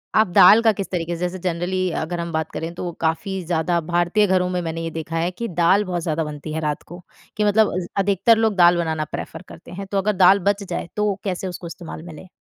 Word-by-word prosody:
आप 220 0 +5
दाल 185 +5 +7
का 225 - +5
किस 195 -1 -5
तरीके 170 -1 -2
से, - - -9
जैसे 180 +1 -3
जनरली 180 +1 -1
अगर 170 +2 -4
हम 170 0 -4
बात 160 0 -2
करें, 165 +1 -5
तो 175 0 -4
काफ़ी 175 +4 -1
ज़्यादा 170 +1 0
भारतीय 175 +5 +2
घरों 185 -1 +1
में 180 -1 -1
मैंने 165 -1 -4
ये 165 - -3
देखा 165 0 -5
है 170 +2 0
कि 235 +6 -5
दाल 180 +3 +3
बहुत 180 -2 -3
ज़्यादा 160 -1 -1
बनती 150 0 -7
है 160 - -2
रात 150 -1 -2
को। 175 +2 -11 0.4
कि 210 - +1
मतलब 210 +1 +3
अ, - - -2
ज 175 - -6
अधिकतर 200 +3 +3
लोग 220 -2 +1
दाल 175 -1 +5
बनाना 160 -2 -1
प्रेफर - - -6
करते - - -13
हैं। 195 +2 -7
तो 200 - -2
अगर 205 +2 +1
दाल 190 +3 +7
बच 200 0 -1
जाए, 180 - -5
तो 210 -1 0
कैसे 190 -1 -3
उसको 175 -1 -7
इस्तेमाल 165 -1 -9
में 170 -1 -10
लें? 155 - -12
175 Hz, 250 wpm, -21 LUFS, 165-195 Hz, 0.4 s, दाल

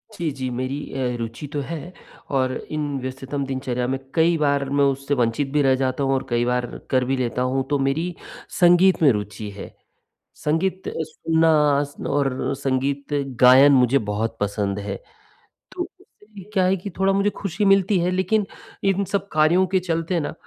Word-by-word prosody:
जी, 170 -5 -2
जी। 130 -2 -4
मेरी 130 +3 -3 0.2
अ, 125 -2 -1
रुचि 115 +5 -5
तो 145 - -1
है 165 +4 -7 0.4
और 130 -1 +1 0.2
इन 150 -2 -2
व्यस्ततम 135 +2 -4
दिनचर्या 130 -2 -2
में 135 +1 -1 0.2
कई 165 0 +3
बार 140 -2 +1
मैं 140 0 +2
उससे 140 +1 0
वंचित 125 +2 0
भी 150 - +3
रह 135 -1 +4
जाता 130 +1 -1
हूँ 135 - +1
और 135 - -1
कई 120 0 +1
बार 125 0 0 0.2
कर 130 -1 +2
भी 135 +1 0
लेता 125 0 -1
हूँ, 130 +1 0
तो 145 -1 +1
मेरी 155 +6 0 0.5
संगीत 175 +1 +5
में 145 -5 +6
रुचि 105 0 -4
है, 100 0 -10 0.6
संगीत 185 +5 -1
सुनना 160 +1 0 0.6
और 140 -2 +1 0.2
अ, - - 0
संगीत 140 +1 -1 0.3
गायन 130 +3 +8
मुझे 130 +1 +4 0.2
बहुत 115 +2 -2
पसंद 100 -1 -1
है, 100 -1 -4 0.8
तो - - -5
उससे 210 -2 -15
क्या 190 -2 +3
है 185 +1 +3
कि 190 +3 -7
थोड़ा 195 0 +3
मुझे 200 +1 +2
खुशी 195 +1 -1
मिलती 195 -1 +4
है 180 +1 +1
लेकिन 190 +3 +1 0.4
इन 195 0 +2
सब 200 0 -1
कार्यों 155 +5 +4
के 190 +1 +1
चलते 170 0 -1
ना 145 - -4
140 Hz, 180 wpm, -22 LUFS, 130-175 Hz, 0.8 s, गायन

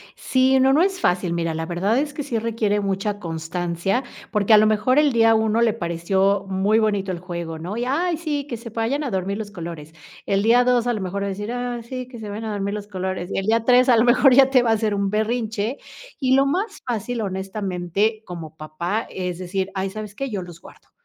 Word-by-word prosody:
Sí, 260 0 +2
no, 265 +1 +5
no 305 - +4
es 380 0 +1
fácil, 180 - +1
mira, 165 -1 -1
la 160 0 -3
verdad 185 +7 0
es 290 +1 -1
que 295 - -4
sí 255 -5 -2
requiere 215 -2 0
mucha 200 +1 -2
constancia, 175 +5 -2 0.3
porque 210 0 +3
a - - +9
lo 215 - +6
mejor 215 +5 +2
el 295 -2 +4
día 225 -2 +4
1 220 0 +2
le 230 -2 +3
pareció 190 +1 0
muy 195 +3 +2
bonito 205 -3 0
el 175 - -4
juego, 170 -2 -6
¿no?, 180 +6 -5
y: 240 - -1
"Ay, 335 +6 0
sí, 295 -4 -3
que 245 - -4
se 230 +1 -9
vayan 230 +7 -1
a 265 - -3
dormir 195 +1 -2
los 215 -2 -6
colores", 165 -5 -8 0.3
el 195 0 +1
día 235 +3 +5
2, 245 -1 +2
a 245 - +2
lo 215 - -3
mejor 190 +2 -3
va - - -1
a - - -2
decir: 205 +3 -4
"Ah, 245 -1 -3
sí, 255 +1 -6
que 250 -2 -11
se 215 -2 -7
vayan 215 +2 -5
a 220 - -3
dormir 200 0 -2
los 210 -1 -5
colores", 185 -2 -4
y - - -2
el 195 - -1
día 225 +1 +2
3, 250 +1 +5
a 240 - +6
lo 225 - +5
mejor 255 +2 +5
ya 265 +1 +6
te 260 -2 +5
va 235 - +1
a - - +5
hacer 215 -1 0
un 200 -1 0
berrinche, 220 +2 -1 0.4
y 260 -2 +3
lo 275 +1 +4
más 390 +9 -2
fácil, 240 0 -2
honestamente, 195 +1 -2
como 165 -3 -8
papá, 170 +8 -3
es 180 -2 -4
decir: 190 +1 -2
"Ay, 190 0 -1
¿sabes 210 0 -7
qué?, 275 +4 -3
yo 205 -5 -3
los 175 -2 -12
guardo", - - -17
210 Hz, 240 wpm, -22 LUFS, 190-245 Hz, 0.4 s, a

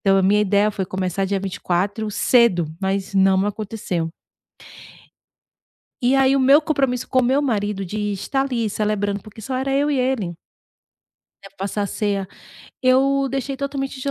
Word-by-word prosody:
Então 195 -1 +3
a - - +2
minha 205 +3 +4
ideia 205 +1 +2
foi 195 -2 -3
começar 185 0 -2
dia 200 0 0
24 195 +3 -2
cedo, 220 -6 +3 0.2
mas 195 0 -2
não 190 0 +4
aconteceu. 205 -5 -3 1.9
E 250 +3 +3
aí 270 0 +4
o - - +2
meu 275 +3 +6
compromisso 270 -6 -1
com 260 - +2
o 255 - +2
meu 265 +4 +2
marido 205 -7 -1
de 205 +4 -5
estar 265 +7 -1
ali 245 -5 -1
celebrando, 205 -1 -1
porque 215 +2 -13
só 255 +5 -4
era 265 +1 -1
eu 285 +2 +2
e 285 - +1
ele. 250 -9 -1 1.1
Até 195 0 -15
passar 200 +2 -3
a - - 0
ceia. 200 -2 -2 0.6
Eu 270 +2 +3
deixei 270 0 -3
totalmente 275 -1 -4
de 280 - -2
215 Hz, 165 wpm, -21 LUFS, 195-265 Hz, 1.9 s, meu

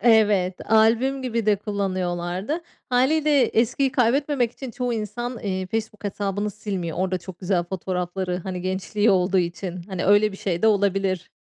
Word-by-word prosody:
evet, 210 -5 +3
albüm 235 +5 +4
gibi 230 -3 -2
de 210 -1 +4
kullanıyorlardı. 185 - -2 0.3
Hâliyle 285 +3 +3
eskiyi 250 +4 +1
kaybetmemek 255 0 +2
için 265 -3 -7
çoğu 245 0 -2
insan, 240 +2 -4
iii, 190 -2 -2
Facebook 220 0 -4
hesabını 205 +1 -2
silmiyor. 185 -5 -4
Orada 185 0 0
çok 180 0 -10
güzel 180 -1 0
fotoğrafları, 180 0 -3
hani, 185 -2 -4
gençliği 190 +3 +1
olduğu 185 0 +3
için. 175 +1 -3
Hani, 185 -2 -3
öyle 205 +1 +4
bir - - -8
şey 175 -3 -2
de 220 - +5
olabilir. 195 -3 +1
200 Hz, 150 wpm, -24 LUFS, 185-230 Hz, 0.3 s, de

